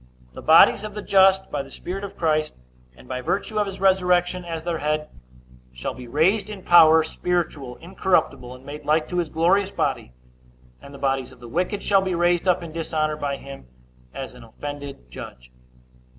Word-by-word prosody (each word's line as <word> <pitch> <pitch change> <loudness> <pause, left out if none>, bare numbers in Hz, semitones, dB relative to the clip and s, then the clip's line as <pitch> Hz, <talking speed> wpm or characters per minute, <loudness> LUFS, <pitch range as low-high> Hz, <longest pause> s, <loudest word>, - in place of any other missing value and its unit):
The - - -9
bodies 160 +5 +6
of 210 -1 -7
the 210 - -5
just, 190 0 +4
by 145 - -1
the 135 - -11
Spirit 185 +8 -6
of 200 - -8
Christ, 155 -2 0 0.4
and - - -16
by 130 0 -4
virtue 205 - -2
of 205 - +1
his 195 -1 -7
resurrection 180 -1 +2
as 165 -2 -5
their 170 -1 -2
head, 150 +1 -1 0.6
shall 60 - -5
be 125 -1 -10
raised 185 - +1
in 200 -3 -8
power, 160 -2 +7
spiritual, 160 -6 -3
incorruptible, 175 -7 -1
and 130 +1 -16
made 150 +2 -8
like 155 +2 +1
to 180 - -3
his 170 -3 -1
glorious 185 +5 +2
body; 130 - -2 0.7
and 140 - -12
the 140 - -10
bodies 135 -2 -1
of 130 - -17
the 120 - -11
wicked 180 - -2
shall 195 -1 +4
be 190 -2 -2
raised 175 +1 +1
up 180 -1 +2
in 165 - -8
dishonor 155 -1 -1
by 140 -2 -3
him, 140 - -11 0.4
as 135 -1 -7
an 125 -1 -13
offended 140 - -8
judge. 60 0 -10
160 Hz, 190 wpm, -23 LUFS, 140-185 Hz, 0.7 s, power